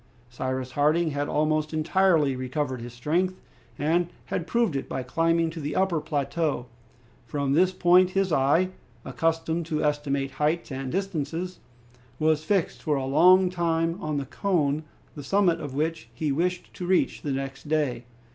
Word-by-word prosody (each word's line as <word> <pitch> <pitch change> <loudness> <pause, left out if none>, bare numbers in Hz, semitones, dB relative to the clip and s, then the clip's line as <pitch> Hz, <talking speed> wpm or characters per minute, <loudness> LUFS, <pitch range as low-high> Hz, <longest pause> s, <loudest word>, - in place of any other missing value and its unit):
Cyrus 130 +1 -3
Harding 155 +5 +2
had 145 0 -2
almost 155 +1 0
entirely 155 -3 +3
recovered 130 0 -3
his 120 +1 -7
strength, 170 +10 -1 0.4
and 170 +4 +1 0.2
had 170 - -3
proved 235 -9 +1
it 135 - -3
by 130 - -3
climbing 165 +5 +1
to 165 - -7
the 145 0 -3
upper 185 -4 +1
plateau. 150 -2 -1 0.6
From 140 +2 -1
this 180 +5 +4
point 180 0 +5
his 195 -1 0
eye, 145 +7 +3 0.4
accustomed 165 +4 -1
to 155 -2 -1
estimate 140 -2 0
heights 150 +4 -1
and 135 -1 -4
distances, 180 -1 -3 0.6
was 155 +1 +2
fixed 190 +1 0
for 150 - 0
a 135 -1 -1
long 180 +7 +5
time 165 0 0
on 155 -1 -2
the 140 - -2
cone, 155 -3 0 0.3
the 145 - -8
summit 180 0 +2
of 140 -2 -6
which 155 -5 -2
he 150 +3 -1
wished 180 +5 -1
to 180 - -6
reach 185 0 +1
the 145 - -3
next 135 +2 -4
day. 145 -6 0
155 Hz, 160 wpm, -26 LUFS, 140-175 Hz, 0.6 s, point